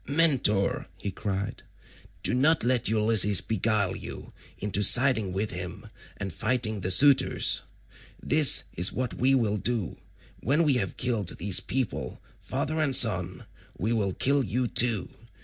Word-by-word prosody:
"Mentor," 140 -10 0
he 100 - -6
cried, 100 +1 -5 0.6
"do - - +2
not 150 +6 +2
let 125 -1 0
Ulysses 105 -3 +3
beguile 105 -3 -1
you - - -10 0.2
into 105 0 -3
siding 110 -2 +4
with 100 +3 -4
him 90 -1 -8 0.3
and 95 -3 -6
fighting 110 0 -2
the 95 - -3
suitors. 135 +9 +4 0.6
This 150 -2 +4
is 90 +3 +2
what 130 -1 -4
we 135 +2 +1
will 110 -5 -1
do: 115 -5 -3 0.4
when 145 +8 0
we 150 -3 +2
have 95 -7 -4
killed 115 -7 -3
these 95 +1 0
people, 105 - -5 0.2
father 155 +1 -4
and 140 -4 +1
son, 95 -7 +2 0.3
we 110 +6 -2
will 100 -4 -2
kill 140 +1 +1
you 120 +4 -3
too. 115 -6 +1
110 Hz, 145 wpm, -25 LUFS, 95-130 Hz, 0.6 s, siding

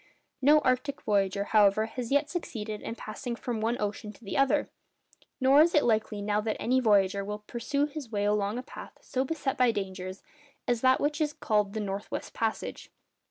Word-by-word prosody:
No 295 +3 +6
arctic 255 +2 0
voyager, 200 -2 +1
however, 210 0 +4
has 235 +2 -6
yet 285 +1 +3
succeeded 220 - -5
in 230 - -5
passing 235 +2 -5
from 235 -2 -4
one 230 +2 0
ocean 210 0 -3
to 220 - -20
the 195 - -5
other. 275 0 +3 0.7
Nor 270 +2 +6
is 335 +2 +4
it 295 - +5
likely 215 -2 0
now 210 0 +1
that 215 0 -2
any 255 +3 +2
voyager 200 -4 +3
will 210 +1 -6
pursue 280 +6 -1
his 295 -5 -7
way 205 -1 0
along 205 +1 +1
a 250 - -4
path - - -11
so 260 0 -1
beset 270 -2 -2
by 250 -1 +5
dangers 190 -2 -5 0.4
as 240 -2 +1
that 260 0 +4
which 295 +2 0
is 300 -1 +1
called 210 -5 0
the 220 - -2
north 200 -1 -4
west - - -5
passage. 225 -1 -3
225 Hz, 195 wpm, -29 LUFS, 205-265 Hz, 0.7 s, No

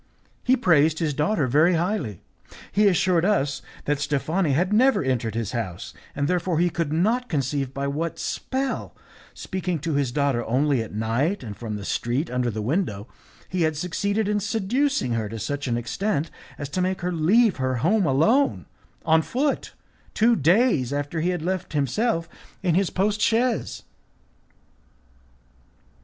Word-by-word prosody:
He 255 +1 +3
praised 160 - +3
his 160 -3 0
daughter 150 +2 +1
very 155 +8 +4
highly. 170 - -2 0.5
He 210 +1 +4
assured 180 -2 +3
us 145 -9 +1 0.2
that 145 -1 0
Steffani 150 +3 0
had 180 +8 +1
never 255 - +4
entered 120 -4 -1
his 115 -2 -2
house, 100 -8 -5 0.2
and 140 0 0
therefore 180 -1 0
he 175 +1 +2
could 165 -4 -2
not 225 +10 +1
conceive 135 -2 -1
by 140 +1 -3
what 155 +4 -2
spell, 265 0 -3 0.4
speaking 180 -2 -3
to 160 0 -2
his 140 -3 0
daughter 140 -3 +1
only 135 +2 +1
at 110 - -6
night 115 - -1
and 105 -4 -7
from 110 -1 -5
the 100 -1 -6
street 125 +10 -1
under 125 -1 0
the 110 -1 -4
window, 120 - -1 0.4
he 185 -1 -2
had 155 -2 +1
succeeded 200 +5 -1
in 210 0 +1
seducing 225 - 0
her 110 -2 -1
to 115 - -6
such 140 +6 -3
an 120 -1 0
extent 155 - -2 0.3
as 145 - -5
to 180 +6 -2
make 185 +1 -1
her 180 +1 -1
leave 190 +6 +3
her 130 -1 0
home 175 - +2
alone, 220 - +2 0.4
on 160 0 +4
foot, 275 - -1 0.4
two 230 +2 +4
days 170 - +3
after 145 +3 -2
he 175 - +1
had 175 -3 -2
left 185 -1 -3
himself 165 - 0 0.4
in 175 -3 +2
his 185 +2 +2
post 205 +2 0
chaise. 230 +2 +1
160 Hz, 160 wpm, -24 LUFS, 135-195 Hz, 0.5 s, very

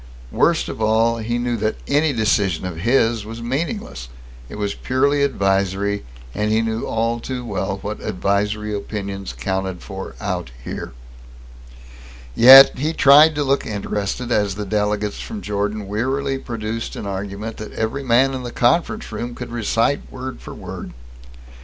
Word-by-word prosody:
Worst - - +2
of - - -6
all, 115 +2 +2
he 120 +2 -2
knew 120 0 -1
that 110 0 -1
any 145 +2 +2
decision 105 -7 +1
of 90 -3 -5
his 115 +2 +2
was 115 +2 -8
meaningless. 130 - -4 0.4
It - - -8
was 105 -1 -2
purely 140 +3 +1
advisory, 100 -5 0 0.3
and 105 +1 -1
he 110 +1 +2
knew 110 0 -2
all 115 +1 0
too 125 0 -5
well 100 -2 -2
what 105 +1 -5
"advisory" 105 +3 -1
opinions 100 -1 -5
counted 95 -2 -3
for - - -7
out - - -3
here. - - -6 1.4
Yet 130 - +9
he 155 +4 0
tried 150 +2 +7
to 145 - 0
look 140 0 +1
interested 105 +2 -3
as 105 -4 +1
the 105 +1 -4
delegate 105 0 0
from 220 -2 -7
Jordan 105 0 -2
wearily 135 +6 -1
produced 115 -2 -4
an - - -6
argument 100 +3 -5
that 110 - -7
every 115 +5 -2
man 130 +1 +3
in 130 - -4
the 120 -1 -6
conference 170 - +1
room 120 0 -5
could 125 -1 -7
recite 115 +3 0
word 130 0 -7
for - - -9
word. - - -8
110 Hz, 155 wpm, -21 LUFS, 100-130 Hz, 1.4 s, Yet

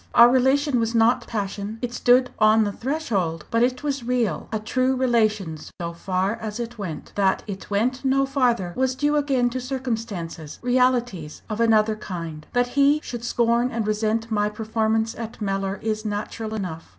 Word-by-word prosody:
Our 235 +1 +9
relation 265 +1 +3
was 230 0 -1
not 230 +2 +3
passion; 205 0 -4
it 240 0 -2
stood 250 +1 +4
on 215 +1 +5
the 205 - -1
threshold 200 - -2
but 230 - +2
it 250 +3 +1
was 280 -3 -2
real 235 -8 -1
a 220 - 0
true 255 +4 0
relation 215 -10 +1 0.2
so 170 -1 -4
far 185 +4 -1
as 220 -1 -5
it 235 -1 -5
went. 170 -6 -6
That 195 -2 +1
it 195 -3 -7
went 245 +6 0
no 270 0 +3
farther 245 -10 +1
was 260 0 +1
due 295 +2 +1
again 270 -4 +2
to 255 +1 -3
circumstances 225 - -4
realities 245 -10 +1
of 215 +2 -1
another 220 -1 +4
kind. 165 -7 -7
That 245 0 +2
he 285 +3 +4
should 240 -2 -6
scorn 235 +1 +2
and 230 -3 -2
resent 220 +2 -1
my 210 -1 +1
performance 220 +1 0
at 230 -2 -7
Mellor 195 -1 -1
is 215 -1 -1
natural 215 +1 -4
enough. 170 - -5
225 Hz, 175 wpm, -24 LUFS, 205-250 Hz, 0.2 s, Our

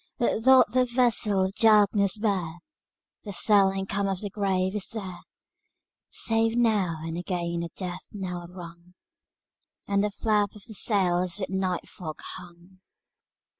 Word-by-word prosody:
Say, 240 - +2
what - - -3
doth 260 -3 +6
that 255 -1 +2
vessel 225 -6 +2
of 190 - -4
darkness 210 -2 +4
bear? 190 -6 -1 0.7
The 205 - -7
silent 195 -1 +3
calm 200 0 0
of 195 -2 -2
the 205 -2 -5
grave 190 -2 0
is 210 -2 -2
there, 190 -6 -7 0.9
Save 225 0 +1
now 200 -9 +1
and 165 +1 -4
again 170 -2 -3
a 170 - -5
death 180 -2 -6
knell 180 -4 -6
rung, 175 0 -12 0.9
And 200 0 +1
the 210 - +1
flap 205 0 0
of 210 - -13
the 225 - -10
sails 185 -3 +1
with 190 - -4
night 185 -2 -2
fog 155 -4 -8
hung. 175 +1 -14
195 Hz, 150 wpm, -26 LUFS, 180-210 Hz, 0.9 s, doth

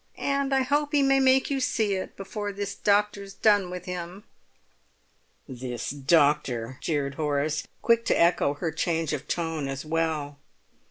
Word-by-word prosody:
"And 280 0 -1
I 265 -1 +3
hope 290 +3 0
he 285 -1 +4
may 270 0 +4
make 265 +1 +3
you 275 - 0
see 220 -5 0
it 190 -1 -5
before 205 +1 -5
this 200 0 -4
doctor's 200 -1 0
done 205 -4 +3
with 180 0 -7
him!" 180 +1 -6 1.2
"This 125 -3 -5
doctor!" 140 -4 +1
jeered 145 -3 -1
Horace, 150 +1 -1 0.2
quick 230 0 +3
to - - +2
echo 170 -4 +3
her 160 +2 -3
change 160 -1 -1
of 150 0 -4
tone 160 -4 -2
as 135 +2 -5
well. 155 -3 -1
170 Hz, 155 wpm, -26 LUFS, 145-210 Hz, 1.2 s, he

